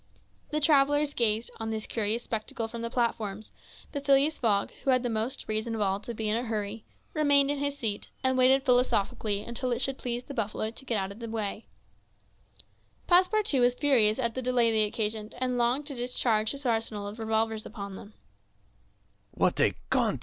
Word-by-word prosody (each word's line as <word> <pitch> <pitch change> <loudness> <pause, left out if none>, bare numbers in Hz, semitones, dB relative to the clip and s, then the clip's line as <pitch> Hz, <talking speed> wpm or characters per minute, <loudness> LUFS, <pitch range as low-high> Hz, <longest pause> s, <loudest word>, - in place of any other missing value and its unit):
The 305 - 0
travellers 290 -1 +3
gazed 225 -1 +1
on 225 0 -3
this 220 -1 -3
curious 225 +1 -1
spectacle 225 0 -4
from 230 +1 -7
the 230 - -3
platforms; 220 -4 -2 0.4
but 285 -2 -4
Phileas 280 +2 +3
Fogg, 205 -4 +1
who - - -1
had 255 -1 +3
the 245 - -1
most 225 +5 -3
reason 220 +1 -2
of 220 - -3
all 195 -1 +1
to 235 +3 -7
be 220 0 -2
in 210 - +2
a 235 - 0
hurry, 220 -2 -3 0.3
remained 285 -2 +4
in 290 - -2
his 285 0 -2
seat, 215 -5 -3
and 260 0 +2
waited 260 +2 +4
philosophically 220 -5 +1
until 245 +2 -3
it 240 - 0
should 270 +1 0
please 245 0 -3
the 280 - -9
buffaloes 220 -1 -2
to 270 - -7
get 235 -4 0
out 195 -1 -2
of 200 - -11
the 230 -1 -6
way. 220 -1 -4 1.4
Passepartout 365 - +3
was 245 0 +4
furious 240 -7 +4
at 235 -3 0
the 260 - -3
delay 245 -2 +2
they 215 -1 +3
occasioned, 215 0 -3
and 250 -1 -1
longed 245 +5 +1
to 285 - -5
discharge 240 -3 0
his 280 +2 -5
arsenal 225 -3 -1
of 210 +3 -8
revolvers 220 0 -1
upon 200 -3 -7
them. 205 +2 -12
235 Hz, 185 wpm, -28 LUFS, 215-260 Hz, 1.4 s, remained